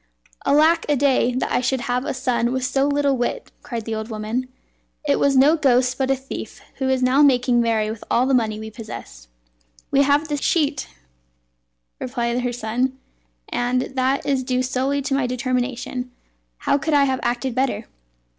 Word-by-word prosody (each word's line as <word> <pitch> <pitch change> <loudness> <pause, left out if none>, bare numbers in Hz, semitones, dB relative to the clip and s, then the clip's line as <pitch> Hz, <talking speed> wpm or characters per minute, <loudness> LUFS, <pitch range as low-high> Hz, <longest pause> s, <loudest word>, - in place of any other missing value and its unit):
"Alack 315 +4 +4
a 295 - +4
day! 260 -3 +2
that 255 - -1
I - - +2
should 255 0 0
have 250 +2 -1
a - - -2
son 245 -2 0
with 260 0 -1
so 270 +2 +1
little 285 -1 +2
wit!" 250 - -3
cried 230 -4 -5
the 225 - -3
old 220 +1 -4
woman; 220 +4 -3 0.6
"it 285 -1 +2
was 275 -1 +3
no 285 +5 +6
ghost, 255 -4 +2
but 265 -1 +1
a 270 - +3
thief, 265 +1 -8 0.2
who 265 -1 -1
is 260 -1 +1
now 255 +3 +4
making 250 -3 +4
merry 220 -2 +1
with 220 - -8
all 245 - +3
the 270 - +1
money 220 -4 +1
we 220 0 -7
possessed." - - -10 0.6
"We 275 - +4
have 285 +2 +3
his 295 -2 -2
sheet," 300 -6 +1 1.1
replied 245 -1 -2
her 245 0 -1
son; 245 +3 -2 0.5
"and 250 +1 0
that 260 +1 +1
is 270 -2 +1
due 255 0 0
solely 270 +2 -1
to 275 - -2
my 270 -2 +1
determination. 250 0 -2 0.5
How 280 - +1
could 310 +1 0
I 285 - +5
have 265 -2 +1
acted 245 +1 -1
better?" 260 +1 -1
255 Hz, 185 wpm, -22 LUFS, 245-275 Hz, 1.1 s, no